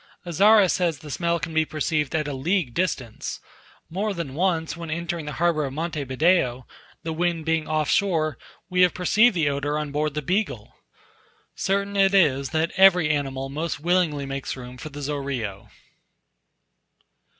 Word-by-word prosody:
Azara 200 Hz, +4 st, +5 dB
says 170 Hz, -3 st, 0 dB
the 150 Hz, -2 st, -10 dB
smell 170 Hz, +2 st, 0 dB
can 160 Hz, -, -5 dB
be 160 Hz, 0 st, +3 dB
perceived 155 Hz, 0 st, -1 dB
at 155 Hz, -1 st, 0 dB
a 145 Hz, -, -3 dB
league 150 Hz, 0 st, 0 dB
distant; 130 Hz, -10 st, -2 dB, 0.5 s
more 200 Hz, +4 st, -2 dB
than 165 Hz, -6 st, -5 dB
once, 165 Hz, 0 st, 0 dB
when 170 Hz, -1 st, -7 dB
entering 170 Hz, -1 st, -3 dB
the 150 Hz, -, -4 dB
harbour 170 Hz, -2 st, +1 dB
of 135 Hz, -2 st, -4 dB
Monte 155 Hz, -1 st, -3 dB
Video, 130 Hz, -3 st, +1 dB, 0.4 s
the 160 Hz, -, -3 dB
wind 170 Hz, -1 st, -1 dB
being 165 Hz, -1 st, 0 dB
off 155 Hz, -1 st, 0 dB
shore, 165 Hz, -, +1 dB, 0.3 s
we 180 Hz, 0 st, +1 dB
have 180 Hz, -1 st, +4 dB
perceived 210 Hz, +5 st, +4 dB
the 160 Hz, -4 st, +2 dB
odour 145 Hz, +1 st, -1 dB
on 150 Hz, -1 st, -3 dB
board 150 Hz, 0 st, -1 dB
the 150 Hz, -, -2 dB
Beagle. 195 Hz, +9 st, -2 dB, 0.8 s
Certain 200 Hz, +1 st, -1 dB
it 195 Hz, 0 st, +4 dB
is, 140 Hz, -7 st, +3 dB
that 160 Hz, +1 st, 0 dB
every 180 Hz, -5 st, +6 dB
animal 135 Hz, -2 st, -2 dB
most 155 Hz, +3 st, -3 dB
willingly 165 Hz, -4 st, +1 dB
makes 135 Hz, -1 st, -4 dB
room 125 Hz, 0 st, -9 dB
for 140 Hz, +5 st, -8 dB
the 145 Hz, 0 st, -8 dB
Zorillo. 130 Hz, -8 st, -4 dB
160 Hz, 165 wpm, -24 LUFS, 145-175 Hz, 0.8 s, every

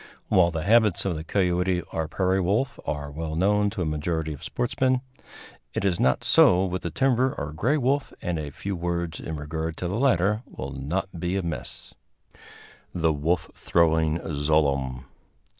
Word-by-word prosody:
While 90 Hz, -2 st, +5 dB
the 80 Hz, 0 st, -3 dB
habits 110 Hz, -2 st, +4 dB
of 95 Hz, -3 st, 0 dB
the 80 Hz, -, -5 dB
coyote 90 Hz, 0 st, +1 dB
or 80 Hz, -1 st, -1 dB
prairie 95 Hz, +3 st, +1 dB
wolf 105 Hz, +10 st, 0 dB
are 70 Hz, -1 st, -3 dB
well 80 Hz, +1 st, -4 dB
known 105 Hz, +4 st, +3 dB
to 100 Hz, -3 st, -3 dB
a -, -, -2 dB
majority 80 Hz, +1 st, -2 dB
of 70 Hz, -, -11 dB
sportsmen, 130 Hz, +1 st, 0 dB, 0.7 s
it -, -, -1 dB
is 90 Hz, -3 st, +1 dB
not 65 Hz, -, +2 dB
so 95 Hz, +1 st, +5 dB
with 90 Hz, 0 st, -3 dB
the 85 Hz, -, -3 dB
timber 130 Hz, +3 st, +2 dB
or 75 Hz, +1 st, -4 dB
gray 120 Hz, -, +1 dB
wolf, 135 Hz, +1 st, 0 dB
and 85 Hz, -2 st, -2 dB
a 75 Hz, -1 st, -4 dB
few 100 Hz, +7 st, -5 dB
words 85 Hz, -1 st, -2 dB
in 80 Hz, -, -5 dB
regard 80 Hz, +2 st, -4 dB
to 90 Hz, -, -3 dB
the 100 Hz, +6 st, -2 dB
latter 105 Hz, -5 st, +2 dB
will 65 Hz, +1 st, -7 dB
not 85 Hz, +7 st, -3 dB
be 90 Hz, +2 st, -1 dB
amiss. 85 Hz, -5 st, -5 dB, 0.4 s
[Illustration: -, -, -21 dB, 0.5 s
THE 80 Hz, -2 st, +2 dB
WOLF 80 Hz, +3 st, -1 dB
THROWING 80 Hz, -1 st, +2 dB, 0.2 s
ZLOOEM. 70 Hz, -4 st, +1 dB
85 Hz, 175 wpm, -25 LUFS, 80-100 Hz, 0.7 s, While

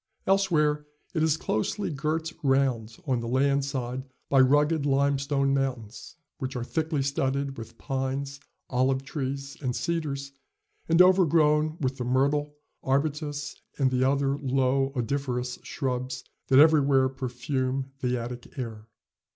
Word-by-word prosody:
Elsewhere 155 Hz, -7 st, +2 dB, 0.3 s
it 160 Hz, -, 0 dB
is 160 Hz, -1 st, +3 dB
closely 165 Hz, -, -1 dB
girt 160 Hz, +3 st, -2 dB
round 130 Hz, -5 st, +1 dB
on 130 Hz, -4 st, +1 dB
the 115 Hz, -, -4 dB
land 140 Hz, +3 st, +2 dB
side 130 Hz, -2 st, -3 dB, 0.3 s
by 135 Hz, -, +4 dB
rugged 145 Hz, +4 st, +4 dB
limestone 140 Hz, 0 st, +1 dB
mountains, 130 Hz, -5 st, -3 dB, 0.2 s
which 130 Hz, -2 st, -4 dB
are 125 Hz, -, -2 dB
thickly 155 Hz, +1 st, -1 dB
studded 140 Hz, 0 st, -1 dB
with 115 Hz, -1 st, -10 dB
pines, 135 Hz, +1 st, -3 dB, 0.3 s
olive 130 Hz, +1 st, +1 dB
trees 140 Hz, 0 st, -4 dB
and 125 Hz, -3 st, -1 dB
cedars, 145 Hz, -5 st, -2 dB, 0.6 s
and 165 Hz, +2 st, +7 dB
overgrown 155 Hz, -4 st, +4 dB
with 130 Hz, -2 st, -1 dB
the 125 Hz, -, -3 dB
myrtle, 140 Hz, +4 st, +1 dB, 0.3 s
arbutus, 145 Hz, +2 st, -1 dB, 0.2 s
and 135 Hz, -2 st, +2 dB
the 130 Hz, 0 st, +2 dB
other 140 Hz, +1 st, +1 dB
low 135 Hz, 0 st, +1 dB
odoriferous 125 Hz, 0 st, -2 dB
shrubs 130 Hz, -2 st, -3 dB, 0.2 s
that 130 Hz, -, +4 dB
everywhere 140 Hz, -3 st, +6 dB
perfume 130 Hz, +1 st, -3 dB
the 125 Hz, -1 st, 0 dB
Attic 120 Hz, +2 st, -7 dB
air. 110 Hz, -4 st, -6 dB
135 Hz, 130 wpm, -27 LUFS, 130-150 Hz, 0.6 s, and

